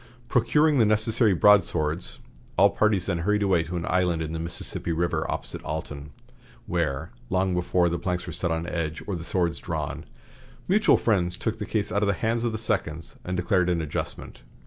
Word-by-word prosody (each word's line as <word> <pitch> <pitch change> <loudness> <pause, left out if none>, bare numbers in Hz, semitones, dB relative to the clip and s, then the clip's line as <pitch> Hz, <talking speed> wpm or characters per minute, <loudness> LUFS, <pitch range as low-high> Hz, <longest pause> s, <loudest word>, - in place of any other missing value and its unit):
Procuring 145 +5 +3
the 115 - +5
necessary 110 0 +3
broadswords, 85 -4 +3 0.4
all 100 +2 +6
parties 105 -4 +2
then 85 -3 -1
hurried 105 +4 +1
away 95 -4 +3
to 85 +2 -5
an 85 - -3
island 90 -2 +1
in 80 0 -5
the 80 - -3
Mississippi 85 0 -3
River 85 +1 -1
opposite - - -4
Alton, 70 0 -5 0.6
where, 70 +4 -2 0.2
long 95 0 +1
before 90 0 +2
the 85 0 -1
planks 90 0 -2
were - - -6
set 85 - -2
on 80 0 -1
edge 80 -2 -3
or 100 - -3
the 85 - -6
swords 85 -1 0
drawn, - - -4 0.6
mutual 205 +3 +4
friends 90 -5 +1
took 110 0 -3
the 105 - -4
case 110 -2 -1
out 100 - +1
of 105 - +2
the 100 - +2
hands 115 +5 -1
of 120 - 0
the 110 - -3
seconds 95 -7 -2
and 90 0 -3
declared 90 -1 +2
an 85 -1 +1
adjustment. 75 -3 -5
90 Hz, 190 wpm, -26 LUFS, 85-105 Hz, 0.6 s, all